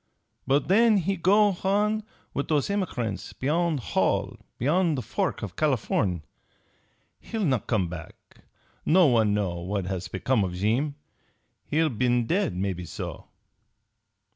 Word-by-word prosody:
But 135 Hz, +1 st, +2 dB
then 220 Hz, +3 st, +5 dB
he 195 Hz, +1 st, 0 dB
go 205 Hz, +4 st, +4 dB
h'on 205 Hz, +4 st, +1 dB, 0.3 s
with 140 Hz, -, -2 dB
those 150 Hz, 0 st, +1 dB
h'emigrant 125 Hz, -, -2 dB
beyon' 160 Hz, +3 st, +1 dB
Hall, 125 Hz, -, 0 dB, 0.2 s
beyon' 165 Hz, +5 st, +2 dB
the 130 Hz, -, -3 dB
fork 190 Hz, -9 st, -2 dB
for 105 Hz, -, -3 dB
Californ'. 100 Hz, -, 0 dB, 1.0 s
He'll 220 Hz, -3 st, -3 dB
not 130 Hz, -, 0 dB
come 105 Hz, -7 st, +1 dB
back. 85 Hz, -1 st, -8 dB, 0.7 s
No 180 Hz, +2 st, +5 dB
one 110 Hz, -6 st, +3 dB
know 95 Hz, -4 st, -1 dB
what 95 Hz, +2 st, -3 dB
has 95 Hz, -1 st, -3 dB
become 110 Hz, +4 st, 0 dB
of 90 Hz, -2 st, -3 dB
Jeem. 120 Hz, +10 st, 0 dB, 0.7 s
He'll 160 Hz, +1 st, +2 dB
been 120 Hz, -1 st, +1 dB
dead, 180 Hz, -, 0 dB
maybe 90 Hz, -1 st, -2 dB
so." -, -, -7 dB
135 Hz, 135 wpm, -26 LUFS, -, 1.0 s, then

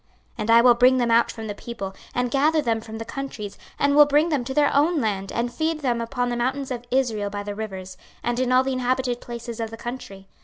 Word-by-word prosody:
26:034:013 -, -, -36 dB
And 215 Hz, +1 st, -3 dB
I 230 Hz, 0 st, +8 dB
will 245 Hz, 0 st, +7 dB
bring 250 Hz, +2 st, +5 dB
them 240 Hz, -2 st, +1 dB
out 230 Hz, 0 st, +4 dB
from 225 Hz, -1 st, -8 dB
the 210 Hz, -, -4 dB
people, 200 Hz, -3 st, -7 dB, 0.2 s
and 245 Hz, -1 st, 0 dB
gather 300 Hz, +4 st, +3 dB
them 230 Hz, -6 st, 0 dB
from 220 Hz, 0 st, -8 dB
the 225 Hz, -, -6 dB
countries, 255 Hz, -8 st, -6 dB, 0.2 s
and 280 Hz, 0 st, +2 dB
will 295 Hz, 0 st, +8 dB
bring 295 Hz, +3 st, +3 dB
them 290 Hz, -6 st, 0 dB
to 265 Hz, -, -4 dB
their 290 Hz, -1 st, +3 dB
own 310 Hz, +3 st, +3 dB
land, 200 Hz, -5 st, -2 dB
and 240 Hz, +1 st, -2 dB
feed 315 Hz, -1 st, -1 dB
them 240 Hz, -4 st, 0 dB
upon 245 Hz, +1 st, -2 dB
the 240 Hz, -, -1 dB
mountains 260 Hz, +3 st, -2 dB
of 245 Hz, -1 st, -4 dB
Israel 235 Hz, -6 st, 0 dB
by 205 Hz, 0 st, -5 dB
the 205 Hz, 0 st, -5 dB
rivers, 190 Hz, -3 st, -7 dB, 0.3 s
and 240 Hz, +1 st, -1 dB
in 255 Hz, -1 st, +1 dB
all 255 Hz, +1 st, +5 dB
the 265 Hz, 0 st, -1 dB
inhabited 255 Hz, -1 st, -1 dB
places 235 Hz, -1 st, -7 dB
of 225 Hz, -1 st, -2 dB
the 225 Hz, -, -9 dB
country. 210 Hz, -6 st, -8 dB
240 Hz, 255 wpm, -24 LUFS, 225-265 Hz, 0.3 s, I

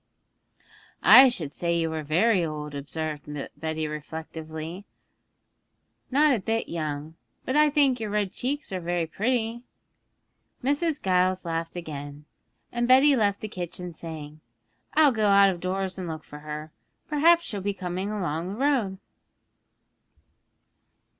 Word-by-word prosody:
'I 265 Hz, 0 st, +10 dB
should 160 Hz, -, -4 dB
say 170 Hz, -1 st, 0 dB
you 165 Hz, -1 st, 0 dB
were 160 Hz, -1 st, -3 dB
very 180 Hz, +6 st, +2 dB
old,' 150 Hz, -2 st, -4 dB
observed 150 Hz, +1 st, -5 dB, 0.3 s
Betty 160 Hz, -1 st, -3 dB
reflectively, 160 Hz, +3 st, -7 dB, 1.3 s
'not 290 Hz, +2 st, +4 dB
a -, -, -2 dB
bit 225 Hz, +3 st, -1 dB
young; 155 Hz, -2 st, -4 dB, 0.3 s
but 260 Hz, -, -1 dB
I 300 Hz, 0 st, +5 dB
think 280 Hz, -4 st, +3 dB
your 220 Hz, -2 st, -3 dB
red 205 Hz, -2 st, 0 dB
cheeks 280 Hz, +1 st, -3 dB
are 185 Hz, -, -2 dB
very 175 Hz, -1 st, -1 dB
pretty.' 230 Hz, +5 st, -1 dB, 1.0 s
Mrs. 290 Hz, +3 st, 0 dB
Giles 185 Hz, 0 st, +1 dB
laughed 165 Hz, 0 st, -3 dB
again, 145 Hz, -3 st, -7 dB, 0.5 s
and 240 Hz, 0 st, 0 dB
Betty 270 Hz, +3 st, +6 dB
left 205 Hz, -4 st, +1 dB
the 215 Hz, -, -4 dB
kitchen 180 Hz, -2 st, -6 dB
saying, 155 Hz, -2 st, -8 dB, 0.6 s
'I'll 305 Hz, -3 st, +6 dB
go 215 Hz, -3 st, +1 dB
out 200 Hz, -1 st, +6 dB
of 175 Hz, -, -6 dB
doors 190 Hz, +1 st, -2 dB
and 180 Hz, -, -4 dB
look 160 Hz, -1 st, -6 dB
for 150 Hz, -, -11 dB
her; 150 Hz, +1 st, -7 dB, 0.4 s
perhaps 330 Hz, +3 st, +4 dB
she'll 205 Hz, -3 st, -4 dB
be 200 Hz, +1 st, -2 dB
coming 185 Hz, +1 st, -3 dB
along 175 Hz, -5 st, -2 dB
the -, -, -6 dB
road.' 245 Hz, -7 st, +1 dB
185 Hz, 140 wpm, -26 LUFS, 160-230 Hz, 1.3 s, I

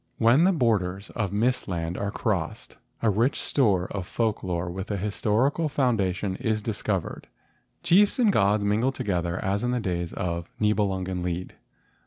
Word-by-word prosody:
When 120 Hz, +9 st, +5 dB
the 190 Hz, -, +5 dB
borders 100 Hz, -, 0 dB
of 105 Hz, -5 st, -2 dB
mist 120 Hz, +5 st, 0 dB
land 85 Hz, -2 st, -3 dB
are 100 Hz, +1 st, -2 dB
crossed, -, -, -3 dB, 0.3 s
a 110 Hz, -, +4 dB
rich 115 Hz, +7 st, +1 dB
store 100 Hz, -10 st, +2 dB
of 95 Hz, -3 st, -4 dB
folk 110 Hz, -3 st, -1 dB
lore 85 Hz, -1 st, -2 dB
with 95 Hz, +3 st, -5 dB
a 100 Hz, -, -1 dB
historical 110 Hz, -, 0 dB
foun¬ 130 Hz, -4 st, +2 dB
dation 95 Hz, 0 st, -2 dB
is 110 Hz, -4 st, 0 dB
discovered. 105 Hz, -4 st, -3 dB, 0.6 s
Chiefs 200 Hz, +8 st, +4 dB
and 225 Hz, -6 st, +4 dB
gods 100 Hz, -, +3 dB
mingle 110 Hz, +6 st, +2 dB
together 90 Hz, -7 st, -2 dB
as 100 Hz, +3 st, 0 dB
in 120 Hz, -, 0 dB
the 125 Hz, 0 st, 0 dB
days 85 Hz, -5 st, -2 dB
of 85 Hz, -2 st, -3 dB
the 105 Hz, -, +3 dB
Nibelungen 95 Hz, -3 st, -1 dB
Lied. 90 Hz, +1 st, -3 dB
100 Hz, 170 wpm, -26 LUFS, 90-120 Hz, 0.6 s, When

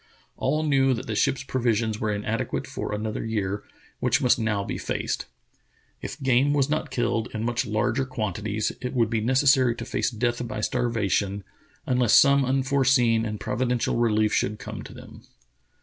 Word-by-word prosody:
All 155 Hz, +1 st, 0 dB
knew 135 Hz, -3 st, +3 dB
that 115 Hz, -, -6 dB
the 110 Hz, -, -3 dB
ship's 130 Hz, +5 st, +1 dB
provisions 115 Hz, -4 st, 0 dB
were 110 Hz, -1 st, -1 dB
inadequate 105 Hz, +2 st, -2 dB
for -, -, -5 dB
another 105 Hz, +1 st, -3 dB
year, 105 Hz, -2 st, -2 dB, 0.4 s
which 120 Hz, -1 st, +2 dB
must 125 Hz, -2 st, +3 dB
now 110 Hz, -3 st, 0 dB
be -, -, -4 dB
faced. -, -, -3 dB, 0.7 s
If 140 Hz, -, -6 dB
game 135 Hz, +2 st, +3 dB
was 145 Hz, 0 st, +1 dB
not 155 Hz, -, -1 dB
killed 120 Hz, -1 st, -1 dB
in 110 Hz, -, -2 dB
much 120 Hz, 0 st, -1 dB
larger 110 Hz, +4 st, 0 dB
quantities, 110 Hz, -3 st, -2 dB
it 125 Hz, +1 st, -4 dB
would 115 Hz, -2 st, +2 dB
be 115 Hz, -1 st, 0 dB
necessary 130 Hz, 0 st, +3 dB
to -, -, -6 dB
face -, -, -1 dB
death 120 Hz, +1 st, -2 dB
by 110 Hz, -, -4 dB
starvation, 105 Hz, -5 st, 0 dB, 0.4 s
unless 125 Hz, -3 st, +3 dB
some 140 Hz, 0 st, +6 dB
un 135 Hz, +1 st, +1 dB
foreseen 130 Hz, -4 st, +3 dB
and 105 Hz, -1 st, -5 dB
providential 120 Hz, +1 st, -1 dB
relief 110 Hz, -2 st, +2 dB
should 105 Hz, +2 st, 0 dB
come -, -, -7 dB
to -, -, -10 dB
them. -, -, -12 dB
120 Hz, 170 wpm, -25 LUFS, 110-130 Hz, 0.7 s, some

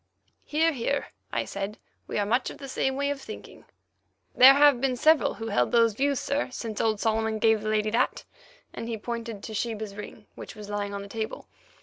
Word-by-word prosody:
"Hear, 320 Hz, +2 st, +2 dB
hear," 280 Hz, +1 st, -2 dB, 0.2 s
I -, -, -1 dB
said; 200 Hz, +2 st, -5 dB, 0.3 s
"we -, -, -3 dB
are 205 Hz, -, +1 dB
much 240 Hz, +5 st, +1 dB
of -, -, -9 dB
the 275 Hz, -, -8 dB
same 265 Hz, 0 st, -1 dB
way 280 Hz, +1 st, 0 dB
of 280 Hz, -1 st, -5 dB
thinking." -, -, -10 dB, 0.7 s
"There 265 Hz, +2 st, +9 dB
have 285 Hz, -3 st, +5 dB
been 265 Hz, -2 st, +1 dB
several 310 Hz, +4 st, +4 dB
who 225 Hz, 0 st, -5 dB
held 125 Hz, 0 st, +1 dB
those 230 Hz, -2 st, +4 dB
views, 275 Hz, +3 st, 0 dB
sir, 280 Hz, -1 st, -1 dB
since 230 Hz, -4 st, -4 dB
old 220 Hz, -2 st, +1 dB
Solomon 220 Hz, 0 st, 0 dB
gave 220 Hz, 0 st, +3 dB
the 215 Hz, -, -3 dB
lady 215 Hz, 0 st, +1 dB
that"—and 250 Hz, -, -4 dB
he 230 Hz, -, -2 dB
pointed 230 Hz, -1 st, -5 dB
to 220 Hz, -, -7 dB
Sheba's 220 Hz, -2 st, -3 dB
ring, 210 Hz, +1 st, -9 dB
which -, -, -10 dB
was 210 Hz, -1 st, -9 dB
lying 205 Hz, -1 st, -3 dB
on 200 Hz, -, -5 dB
the -, -, -9 dB
table. 220 Hz, +1 st, -5 dB
225 Hz, 205 wpm, -27 LUFS, 215-270 Hz, 0.7 s, There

